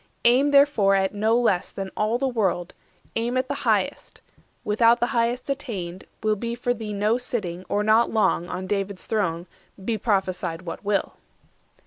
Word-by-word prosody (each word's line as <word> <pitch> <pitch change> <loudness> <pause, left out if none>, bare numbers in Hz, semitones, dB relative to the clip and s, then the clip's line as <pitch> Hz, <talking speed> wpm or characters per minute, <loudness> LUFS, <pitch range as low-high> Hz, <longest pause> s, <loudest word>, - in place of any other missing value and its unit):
Aim, 255 +4 +5
therefore, 280 -9 +5
at 190 0 +1
no 220 +3 +2
less 200 -7 +1
than 195 -1 -6
all 215 +3 +1
the 270 +2 0
world; 190 -8 -1 0.4
Aim 235 +2 0
at 255 0 0
the - - -2 0.2
highest; - - -1 0.4
without 230 +3 +4
the - - +2
highest 235 +1 0
attained, 200 -11 -4 0.2
Will 215 0 +2
be 235 +3 -4
for 245 0 0
thee 220 -3 -6
no 210 +4 +1
sitting, 190 -8 -4
or 205 - +1
not 220 +2 +4
long, 205 -5 +1
On 185 - -4
David's 195 -1 -3
throne, 180 -6 -1 0.4
be 225 -1 -1
prophesied 185 -5 -1
what 170 - -7
will." 205 -1 0
215 Hz, 165 wpm, -24 LUFS, 190-240 Hz, 0.4 s, Aim